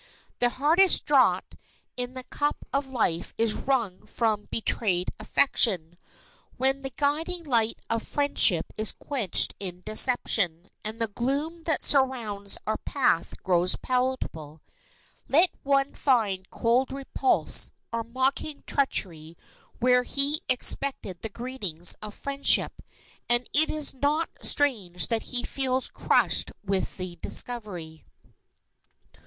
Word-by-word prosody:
The 245 - +2
hardest 320 +9 +2
draught - - +2 0.4
in 250 +1 -4
the 255 - -6
cup 290 +3 -3
of 275 0 -1
life 220 -10 -2
is 225 -1 +2
wrung 235 -10 -2
from 215 -3 -2
betrayed 195 -5 -1
affection, 185 - +1 0.6
when 270 +1 0
the 270 - -5
guiding 310 +6 -2
light 230 -6 +1
of 230 0 -2
friendship 260 - +2
is 215 - +1
quenched 245 - 0
in 180 -2 -3
deception, 200 -7 +2
and 215 +1 -4
the 230 - 0
gloom 285 +10 -4
that 320 - +3
surrounds 235 -8 +1
our 215 +1 -2
path 255 - -2
grows 180 -1 +2
palpable. 250 - -4 0.6
Let 340 +6 +5
one 275 0 0
find 205 -8 -1
cold 240 +3 0
repulse 270 -1 +1 0.2
or 230 0 -2
mocking 260 +5 -3
treachery 170 - -2 0.4
where 250 0 +3
he 280 +4 -1
expected 255 -7 +2
the 225 - -5
greeting 235 -7 -5 0.2
of 210 -1 -8
friendship, 280 0 +1 0.5
and 240 +1 +2
it 310 +2 +7
is 305 -2 0
not 290 +5 -1
strange 210 -12 +3
that 230 -2 +1
he 245 -1 +2
feels 260 -1 +1
crushed - - +1
with 195 -1 -2
the 185 -2 -6
discovery. 180 -8 -2
245 Hz, 120 wpm, -25 LUFS, 200-275 Hz, 0.6 s, it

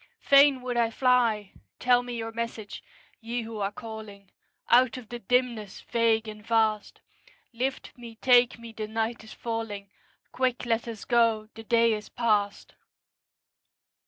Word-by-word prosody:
Fain 275 -2 +5
would 250 -1 -2
I 230 -1 +3
fly! 230 -5 +2 0.3
Tell 245 -1 +3
me 245 -1 -6
your 225 0 -4
message, 230 -2 -5 0.4
Ye 235 +1 -4
who 225 -1 -7
are 200 0 -1
calling 210 -2 -10 0.4
Out 250 +1 +4
of 235 -4 -11
the 240 - -6
dimness 235 -3 -1
vague 230 -1 +1
and 210 -1 -9
vast; 220 -2 0 0.5
Lift 260 +3 -3
me, 235 -2 -11
take 245 +1 +4
me, 235 -1 -10
the 220 -1 -5
night 225 +1 -2
is 220 - -11
falling; 225 -4 -5 0.4
Quick, 255 -1 -1
let 230 0 0
us 225 -3 -7
go, 230 -3 +2
the 225 - -10
day 230 0 +3
is 210 0 -5
past. 210 -4 0
230 Hz, 150 wpm, -27 LUFS, 220-245 Hz, 0.5 s, Fain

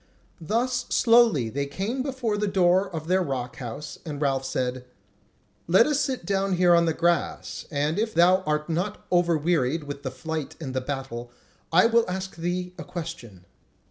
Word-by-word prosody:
Thus 245 +8 -1
slowly 230 - +4
they 140 +4 -2
came 205 - -3
before 255 -5 -2
the 210 0 -1
door 190 0 +3
of 160 -4 -6
their 185 +2 +3
rock 130 -7 -3
house 140 +3 -7
and 150 -4 -6
Ralph 135 -2 0
said: 130 -1 -2 0.8
"Let 190 +7 +6
us 295 0 +1
sit 260 -11 -2
down 195 +1 0
here 175 0 +5
on 170 0 +5
the 165 - +1
grass, 170 0 -1
and 150 +4 0
if 220 0 -1
thou 180 +2 +5
art 150 0 0
not 180 +5 -3
over 175 -2 +3
wearied 155 -1 0
with 145 -1 -7
the 135 - -3
flight 150 +4 -5
and 135 -5 -5
the 130 - -1
battle, 130 -3 -5 0.4
I 175 +5 +6
will 230 -3 +3
ask 190 +1 -4
thee 180 +2 -3
a - - -5
question." 160 - -8
170 Hz, 175 wpm, -25 LUFS, 140-195 Hz, 0.8 s, Let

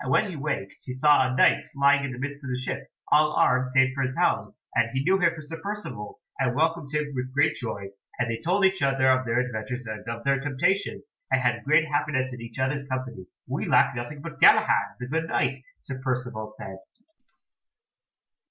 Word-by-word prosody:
When 210 - +2
he - - -7
waked 140 -9 -4
he 125 - -6
saw 130 -1 +4
a - - -2
Knight - - +4
lying 140 0 +4
in 140 - -3
the 125 - -7
midst 140 +2 -5
of 140 - -6
the 125 - -1
ship, 130 - -4 0.2
all 150 +1 +5
armed 130 0 +3
save 130 0 +3
for 135 - -3
his 130 0 -1
helm, - - +1 0.2
and 115 0 +2
he 135 0 0
knew 190 +5 +3
him 170 -2 +2
for 160 - -8
Sir 160 +2 -9
Percivale, 200 - -6 0.2
and 125 -3 +1
welcomed 160 -1 0
him 150 -1 -2
with 130 0 -4
great 145 +3 +3
joy; 105 -8 -5 0.3
and 120 - 0
they 115 -1 -3
told 190 +4 +2
each 190 0 +2
other 135 -1 +2
of 130 -1 +1
their 115 +1 0
adventures 125 0 -4
and 110 -1 -6
of 115 0 -5
their 140 0 +2
temptations, 145 - -1 0.2
and - - +3
had 120 -2 0
great 155 +2 +3
happiness 140 -3 -1
in 125 - -8
each 115 +1 -9
other's 135 +2 -1
company. 130 -8 -5 0.2
"We - - -3
lack - - +4
nothing 140 +5 -6
but 150 -5 -8
Galahad, - - +5
the 125 - -5
good 160 +5 -2
Knight," 135 -4 0 0.2
Sir 130 -1 -7
Percivale 125 -4 -2
said. 95 0 -8
135 Hz, 210 wpm, -26 LUFS, 125-150 Hz, 0.3 s, all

